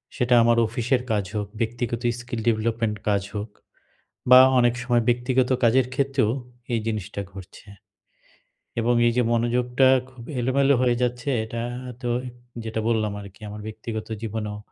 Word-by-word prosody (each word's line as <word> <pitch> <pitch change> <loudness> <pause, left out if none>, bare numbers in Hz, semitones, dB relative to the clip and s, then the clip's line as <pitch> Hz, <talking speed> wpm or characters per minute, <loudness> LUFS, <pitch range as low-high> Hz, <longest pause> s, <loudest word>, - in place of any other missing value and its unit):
সেটা 125 -2 +1
আমার 120 0 +4
অফিসের 120 +3 0
কাজ 105 -3 +1
হোক, 105 -1 -2
ব্যক্তিগত 120 0 -2 0.2
skill 120 -1 -5
development 115 0 0
কাজ 100 -1 +2
হোক 105 +2 -4 0.8
বা 125 0 +10 0.2
অনেক 120 -1 +4
সময় 120 -2 +2
ব্যক্তিগত 125 +1 +1
কাজের 125 +2 +4
ক্ষেত্রেও 135 -5 +1 0.4
এই 115 - +1
জিনিসটা 105 -2 -3
ঘটছে 95 +2 -12 1.1
এবং 120 +2 +2
এই - - +3
যে, 125 - +4
মনোযোগটা 125 +2 +2 0.2
খুব 130 -2 -13 0.2
এলোমেলো 135 +3 +3
হয়ে 120 -1 +3
যাচ্ছে 125 +3 -1
এটা 115 +1 -5 0.4
তো 120 - -2 0.5
যেটা 110 0 -3
বললাম 110 -2 +1
আরকি 100 +2 -13
আমার 105 +1 -8
ব্যক্তিগত 110 0 -6 0.2
জীবনেও 105 -1 -4
115 Hz, 145 wpm, -24 LUFS, 110-125 Hz, 1.1 s, বা